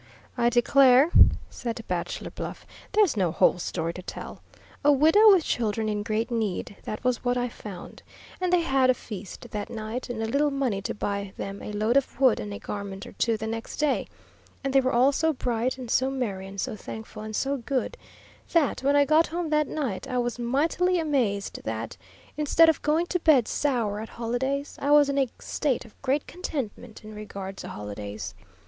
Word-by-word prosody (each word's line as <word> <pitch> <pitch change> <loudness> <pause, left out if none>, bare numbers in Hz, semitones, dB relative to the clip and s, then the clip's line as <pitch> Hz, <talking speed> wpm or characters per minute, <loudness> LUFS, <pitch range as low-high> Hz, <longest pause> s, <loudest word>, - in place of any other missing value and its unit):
"I 240 -1 +3
declare," 260 +4 +5 0.4
said 230 -2 -5
Bachelor 180 -1 -3
Bluff, - - -7 0.3
"there's 415 - +4
no 185 -5 +1
whole 180 - +3
story 165 -1 -2
to 185 - -8
tell. - - -8 0.4
A 290 - +6
widow 320 +10 +7
with 370 -4 +5
children 220 -4 -1
in 210 -1 -1
great 220 +2 -1
need, 215 -4 -2
that 215 - -5
was 250 -1 0
what 245 0 +1
I 245 0 0
found; 205 -6 -10 0.4
and 365 -1 +1
they 360 -1 +4
had 270 -5 +2
a 255 - +5
feast 200 -5 -9
that 210 +1 -4
night, 230 +2 -5
and 225 -2 -3
a - - 0
little 280 +6 +2
money 265 -8 -1
to - - -4
buy 200 -1 -3
them 195 0 -5
a - - -6
load 215 +5 +2
of 275 -2 -1
wood 260 -4 +4
and 105 -1 -5
a 100 - -5
garment 195 - -6
or - - -10
two 230 -1 0
the 220 - -5
next 225 +1 -5
day; 300 -2 +1 0.6
and 270 -1 -1
they 270 - +6
were 260 0 0
all 255 +3 +4
so 320 +3 +1
bright, 245 -1 -1
and 250 -3 -6
so 260 +1 +3
merry, 210 -8 -3
and 195 +1 -8
so - - -2
thankful, 220 +1 -8
and 215 0 -6
so 275 +4 0
good, 260 - -2 0.6
that, 325 -7 +2
when 280 +2 +2
I 285 0 +5
got 310 +3 +4
home 335 -1 -3
that 300 -1 +2
night, 265 -6 -3
I 255 -2 -2
was 240 0 -1
mightily 320 +9 +1
amazed 255 -11 0
that, 110 0 -4 0.4
instead 310 +2 +5
of 320 - +1
going 310 +3 +2
to 360 +1 -1
bed 290 -8 +4
sour 235 -8 0
at 220 - -6
holidays, 265 +5 -2
I 280 - 0
was 290 -1 +6
in 280 0 +1
a 265 -3 +2
state 280 -6 -1
of 230 - -18
great 275 +2 0
contentment 245 - -6
in 215 0 -10
regard 200 -2 -7
to - - -7
holidays. 105 -1 -6
245 Hz, 200 wpm, -26 LUFS, 210-280 Hz, 0.6 s, widow